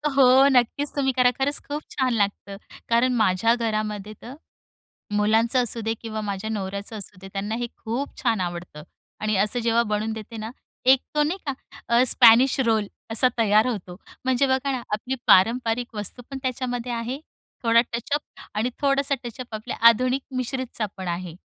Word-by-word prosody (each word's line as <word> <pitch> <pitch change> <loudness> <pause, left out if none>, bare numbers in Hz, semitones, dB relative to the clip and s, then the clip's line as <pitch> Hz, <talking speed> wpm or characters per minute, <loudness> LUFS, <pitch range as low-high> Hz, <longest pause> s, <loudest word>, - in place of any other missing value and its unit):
हो, 265 0 +6
नक्कीच 265 +3 +2
तुम्ही 270 -2 +1
करा 250 -1 +4
खरंच 285 +2 0
खूप 295 +1 -3
छान 255 -2 0
लागतं. 200 -2 -1 0.3
कारण 245 +2 +3
माझ्या 220 +1 +3
घरामध्ये 215 -3 -3
तर 245 - -9 0.8
मुलांचं 225 +4 +2
असू 235 -1 -2
दे 225 - 0
किंवा 220 -1 -5
माझ्या 205 +1 -4
नवऱ्याचं 200 +1 -4
असू 200 -1 -10
दे, 195 - -10
त्यांना 205 +2 -3
हे 240 0 -2
खूप 245 +5 -4
छान 230 -5 +1
आवडतं 175 -3 -5 0.4
आणि 215 -1 0
असं 210 +5 +1
जेव्हा 230 0 +2
बनवून 215 0 -2
देते 220 +1 -8
ना 220 +1 -5 0.4
एक 265 0 +6
तो 300 - +3
नाही 335 +6 -1
का 275 - 0 0.4
अ 235 +1 +4
स्पॅनिश 250 +3 +6
रोल 220 -2 +2 0.2
असा 240 +3 +4
तयार 215 +1 +4
होतो. 190 -7 -4 0.3
म्हणजे 260 +1 +2
बघा 265 +1 0
ना, 255 - -3
आपली 230 +5 -2
पारंपरिक 230 +4 +3
वस्तू 210 +4 -5
पण 270 - -5
त्याच्यामध्ये 250 -2 -3
आहे, 235 +3 -3 0.4
थोडा 230 -1 +5
टचअप 240 +6 -1 0.3
आणि 220 +4 0
थोडासा 280 0 +2
टचअप 240 0 -8
आपल्या 215 0 -5
आधुनिक 255 +3 +2
मिश्रितचा 255 -3 -3
पण 185 -2 -5
आहे. 175 -1 -4
230 Hz, 170 wpm, -24 LUFS, 210-255 Hz, 0.8 s, हो